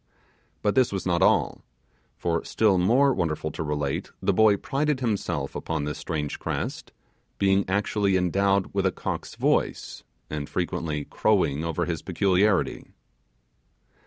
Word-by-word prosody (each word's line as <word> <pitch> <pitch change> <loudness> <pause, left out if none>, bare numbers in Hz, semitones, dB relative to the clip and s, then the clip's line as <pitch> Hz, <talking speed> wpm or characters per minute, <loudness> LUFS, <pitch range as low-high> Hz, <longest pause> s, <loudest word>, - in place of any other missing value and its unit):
But 105 - +2
this 130 -2 +3
was 95 -2 -3
not 85 -2 +1
all; - - +2 0.6
for 85 -1 -1
still 105 -4 +2
more 130 +9 +4
wonderful 80 -5 -2
to - - -6
relate, 75 -2 -2
the - - +1
boy 110 -2 +5
prided 145 +5 -1
himself 100 - -2
upon 80 -3 -3
his 75 - -4
strange 75 -3 -3
crest, - - -4 0.5
being 95 0 +2
actually 100 0 +1
endowed 95 +2 +1
with 100 -1 +1
a - - +1
cock's - - -5
voice, - - -1 0.2
and 75 -2 -5
frequently 85 -5 -2
crowing 85 -9 +1
over 85 +1 -1
his 85 -3 -3
peculiarity. 95 +2 +1
95 Hz, 135 wpm, -26 LUFS, 80-100 Hz, 0.6 s, boy